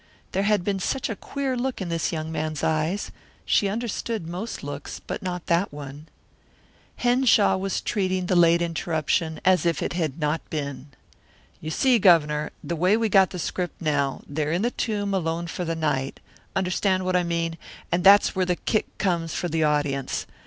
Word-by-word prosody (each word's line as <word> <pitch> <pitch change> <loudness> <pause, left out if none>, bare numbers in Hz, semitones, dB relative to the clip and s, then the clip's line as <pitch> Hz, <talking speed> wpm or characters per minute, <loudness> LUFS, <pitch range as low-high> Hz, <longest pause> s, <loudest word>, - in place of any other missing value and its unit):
There 195 - 0
had 205 -2 +2
been 195 0 -1
such 265 +7 -1
a - - -3
queer 275 +4 -3
look 250 +1 -2
in 185 -3 -4
this 165 -1 -1
young 160 -1 -3
man's 155 -2 -3
eyes; 160 +5 0 0.3
she 200 - +3
understood 225 -3 -3
most 185 +7 -5
looks, 145 0 -6
but - - -6
not 180 -2 -4
that 170 +4 +1
one. 145 +1 -9 0.9
Henshaw 245 -6 +4
was 195 0 -2
treating 185 -3 -1
the 180 - +1
late 170 0 +5
interruption 165 -1 -1
as 185 -3 +4
if 170 -1 0
it - - -2
had 160 -6 -2
not 150 0 0
been. 140 -3 -4 0.7
"You 155 - -6
see, 245 - +3
Governor, 150 -6 +4
the 170 - -3
way 180 +6 +3
we 225 -1 +1
got 190 -1 +5
the 180 - -6
script 180 +1 -3
now, 145 -4 0
they're 150 +1 -2
in 175 +5 0
this 240 - 0
tomb 205 -3 -1
alone 170 -2 -1
for 175 +1 -4
the 165 0 -1
night 140 -4 -1 0.4
understand 185 0 +1
what 185 0 +1
I 180 - +4
mean 170 -1 -1 0.4
and 175 +1 +1
that's 200 +1 +7
where 185 -1 +1
the 180 - +2
kick 215 +4 -2
comes 170 -4 -1
for 175 - -2
the 160 0 +1
audience. 145 -3 0
175 Hz, 185 wpm, -25 LUFS, 155-195 Hz, 0.9 s, that's